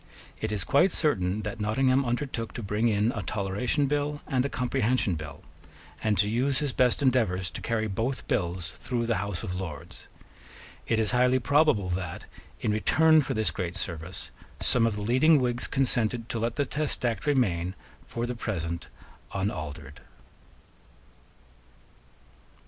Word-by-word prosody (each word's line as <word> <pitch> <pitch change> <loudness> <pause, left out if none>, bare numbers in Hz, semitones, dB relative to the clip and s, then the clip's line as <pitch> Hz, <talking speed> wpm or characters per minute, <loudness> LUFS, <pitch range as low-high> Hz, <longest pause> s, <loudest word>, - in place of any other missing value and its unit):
It 110 - -1
is 105 -4 0
quite 145 - +4
certain 105 - +1
that 115 - -5
Nottingham 130 +5 +2
undertook 120 -2 -2
to 120 - -5
bring 105 +4 +1
in 105 +1 +2
a 115 - -4
Toleration 100 - 0
Bill 145 +1 -1
and 130 -2 +1
a 140 - -1
Comprehension 125 -4 +1
Bill, 75 -2 -7 0.6
and 105 -2 +2
to 105 - +3
use 130 +5 +1
his 145 -3 -1
best 125 +3 +3
endeavours 110 -9 +2
to - - -7
carry 115 -1 0
both 115 +6 -2
bills 90 -1 -1
through 120 -1 -2
the 115 -1 +1
House 100 -3 -3
of 90 - -3
Lords. 80 -7 -7 0.8
It 115 - +2
is 110 -1 +1
highly 125 +1 +4
probable 130 -6 +3
that, 90 -2 -4 0.4
in 105 - +1
return 155 +9 +4
for 135 - -3
this 110 0 +1
great 90 -2 -4
service, 85 -1 -4 0.3
some 115 -2 +3
of 110 - -1
the 105 - -4
leading 130 +8 +5
Whigs 120 -1 0
consented 120 -3 0
to 115 - -2
let 115 +1 -1
the 145 - +1
Test 150 -3 -2
Act 120 +4 -1
remain 95 -10 +1 0.3
for 120 0 -3
the 125 - -3
present 85 -8 -3 0.5
unaltered. 80 -7 -4
115 Hz, 155 wpm, -28 LUFS, 95-130 Hz, 0.8 s, leading